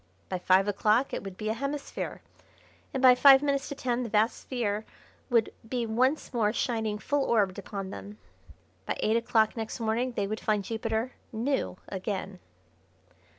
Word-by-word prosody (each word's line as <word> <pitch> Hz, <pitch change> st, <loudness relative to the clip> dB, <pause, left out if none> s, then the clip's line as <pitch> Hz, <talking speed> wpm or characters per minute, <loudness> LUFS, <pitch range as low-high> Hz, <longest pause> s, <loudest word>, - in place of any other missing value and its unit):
By 185 Hz, -, -2 dB
five 190 Hz, +2 st, +4 dB
o'clock 215 Hz, +5 st, +2 dB
it -, -, -3 dB
would 195 Hz, -2 st, -8 dB
be 215 Hz, 0 st, -3 dB
a -, -, +1 dB
hemisphere, 275 Hz, +4 st, -4 dB, 0.7 s
and 265 Hz, -, -3 dB
by 255 Hz, -1 st, +9 dB
five 270 Hz, +2 st, +7 dB
minutes 280 Hz, -1 st, 0 dB
to 285 Hz, -, -4 dB
ten 250 Hz, -2 st, -1 dB
the 240 Hz, -, -3 dB
vast 215 Hz, +3 st, +2 dB
sphere 220 Hz, -5 st, -2 dB, 0.5 s
would 230 Hz, -3 st, +2 dB, 0.2 s
be 245 Hz, -2 st, -1 dB
once 255 Hz, +7 st, +1 dB
more 220 Hz, -3 st, +2 dB
shining 220 Hz, -3 st, -1 dB
full 280 Hz, +6 st, 0 dB
orbed 205 Hz, -6 st, +1 dB
upon 195 Hz, -1 st, -6 dB
them. 100 Hz, +2 st, -9 dB, 0.7 s
By -, -, -1 dB
eight 220 Hz, -, +2 dB
o'clock 225 Hz, -1 st, +2 dB
next 225 Hz, +1 st, -4 dB
morning 235 Hz, +3 st, 0 dB
they 205 Hz, -, -1 dB
would 215 Hz, +2 st, -3 dB
find 210 Hz, -2 st, 0 dB
Jupiter 225 Hz, +3 st, -2 dB, 0.2 s
"new" 235 Hz, -3 st, -1 dB
again. 190 Hz, -1 st, -4 dB
225 Hz, 165 wpm, -28 LUFS, 205-250 Hz, 0.7 s, by